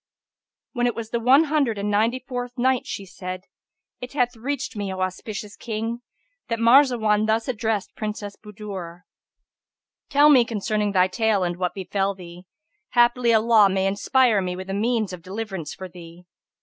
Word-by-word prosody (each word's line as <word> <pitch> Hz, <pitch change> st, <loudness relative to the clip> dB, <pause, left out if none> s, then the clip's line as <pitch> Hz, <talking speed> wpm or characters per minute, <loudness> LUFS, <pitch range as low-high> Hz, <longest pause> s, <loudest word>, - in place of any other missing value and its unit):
When 245 Hz, -2 st, +1 dB
it 240 Hz, -, -1 dB
was 225 Hz, -1 st, -6 dB
the 235 Hz, -, 0 dB
One 260 Hz, +6 st, +5 dB
Hundred 285 Hz, -8 st, 0 dB
and 205 Hz, +1 st, -2 dB
Ninety 225 Hz, +5 st, +2 dB
fourth 245 Hz, 0 st, -5 dB
Night, 255 Hz, 0 st, +1 dB
She 200 Hz, -, -5 dB
said, 185 Hz, 0 st, -7 dB, 0.6 s
It 250 Hz, +2 st, -8 dB
hath 245 Hz, -3 st, 0 dB
reached 265 Hz, +3 st, -4 dB
me, 200 Hz, -2 st, -3 dB
O 190 Hz, -, -5 dB
auspicious 205 Hz, +2 st, -4 dB
King, 230 Hz, +1 st, -4 dB, 0.5 s
that 230 Hz, -2 st, -1 dB
Marzawar 230 Hz, -3 st, +4 dB
thus 220 Hz, +1 st, +1 dB
addressed 220 Hz, -4 st, -2 dB
Princess 210 Hz, -1 st, -5 dB
Budur, 195 Hz, -5 st, -8 dB, 1.1 s
"Tell 295 Hz, +1 st, +6 dB
me 255 Hz, -4 st, +7 dB
concerning 210 Hz, -2 st, -2 dB
thy 185 Hz, -1 st, +4 dB
tale 205 Hz, +1 st, +1 dB
and 175 Hz, -1 st, -1 dB
what 180 Hz, -1 st, -2 dB
befel 195 Hz, +1 st, -1 dB
thee: 175 Hz, 0 st, -12 dB, 0.5 s
haply 240 Hz, 0 st, +4 dB
Allah 220 Hz, -2 st, +5 dB
may 190 Hz, 0 st, 0 dB
inspire 215 Hz, +2 st, +2 dB
me 180 Hz, -1 st, -3 dB
with 185 Hz, +1 st, -6 dB
a -, -, -2 dB
means 220 Hz, -1 st, 0 dB
of 180 Hz, -, -8 dB
deliverance 190 Hz, -4 st, -6 dB
for 190 Hz, -, -7 dB
thee." 175 Hz, -1 st, -13 dB
215 Hz, 165 wpm, -23 LUFS, 190-240 Hz, 1.1 s, me